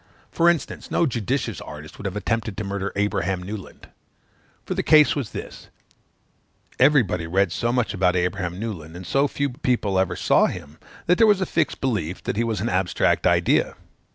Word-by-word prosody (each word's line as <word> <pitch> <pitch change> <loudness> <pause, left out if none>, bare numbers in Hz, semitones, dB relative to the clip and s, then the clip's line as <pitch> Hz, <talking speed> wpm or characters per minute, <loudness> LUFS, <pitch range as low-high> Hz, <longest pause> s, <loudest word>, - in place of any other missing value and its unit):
For 170 +1 +4
instance, 170 -3 -2
no - - +2
judicious 125 - -2
artist 75 +1 -10
would - - -9
have 95 - -5
attempted 110 -1 -2
to 105 - -3
murder 100 -1 -3
Abraham 95 -3 -1
Newland. 100 0 -8 0.8
For - - -2
the - - -1
case 150 -3 +5
was 135 -7 -3
this; - - -8 1.1
everybody 100 - +3
read 95 +1 +1
so 120 +6 -1
much 125 -2 0
about 90 -2 +2
Abraham 90 0 -1
Newland, 85 -8 -6
and 90 +1 -8
so 135 - +2
few 140 -1 -2
people 120 -7 0
ever 95 - 0
saw - - +3
him, 75 +2 -8 0.3
that 180 +1 +3
there 225 - +6
was 205 -2 +4
a 190 - 0
fixed 160 -4 -1
belief 100 -10 -2
that - - -2
he 115 - +1
was 110 -4 -2
an 115 - -1
abstract 95 -3 +1
idea. - - +2
105 Hz, 180 wpm, -23 LUFS, 90-130 Hz, 1.1 s, there